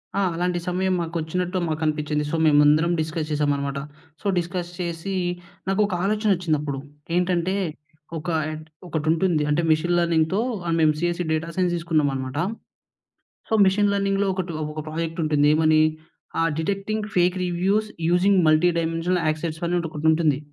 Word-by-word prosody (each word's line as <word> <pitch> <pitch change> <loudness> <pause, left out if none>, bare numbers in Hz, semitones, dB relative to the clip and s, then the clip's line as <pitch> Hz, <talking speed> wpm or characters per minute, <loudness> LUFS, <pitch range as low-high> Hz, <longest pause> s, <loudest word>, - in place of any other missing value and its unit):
ఆ! 200 - +1
అలాంటి 175 +1 0
సమయం 185 +1 0
మాకొచ్చినట్టు 170 +2 -2
మాకనిపించింది. 150 -1 -1
సో, - - 0
మేమందరం 150 +2 +5
డిస్కస్ 155 0 -2
చేసామన్నమాట. 140 -2 0 0.4
సో, - - -3
డిస్కస్ 175 0 -2
చేసీ 170 +2 -3 0.5
నాకు 195 +2 +2
ఒక 195 - -5
ఆలోచనొచ్చిందప్పుడు. 175 -9 0 0.4
ఏంటంటే, 180 +1 +1 0.6
ఒక 160 +3 -5 0.6
ఒకటుంటుంది 160 0 +1
అంటే 150 +3 +2
మెషీన్ 170 +3 +2
లెర్నింగ్‌తో 170 +2 +2 0.4
మేము 155 -1 +5
CSC 175 +1 0
data 160 +1 -1
science 180 -2 +1
తీసుకున్నామనమాట. 145 -6 -1 1.1
So, - - -1
machine 200 +2 +3
లెర్నింగ్‌లో 200 0 +1
ఒకటి 185 -2 -3 0.2
ఒక 155 - -6
ప్రాజెక్ట్ 165 +1 -4
ఉంటుంది 150 -1 +3
ఏమని! 155 0 +4 0.6
ఆహ్, 165 0 +2
detecting 200 +5 -2
fake 180 0 +3
reviews 190 +5 +1 0.2
using 185 +2 +4
multi 155 +3 +4
dimensional 165 +2 0
access 155 +1 -2
అని 175 +1 +1
ఒకటుంటుంది. 155 -1 +2
170 Hz, 130 wpm, -23 LUFS, 155-180 Hz, 1.1 s, మేమందరం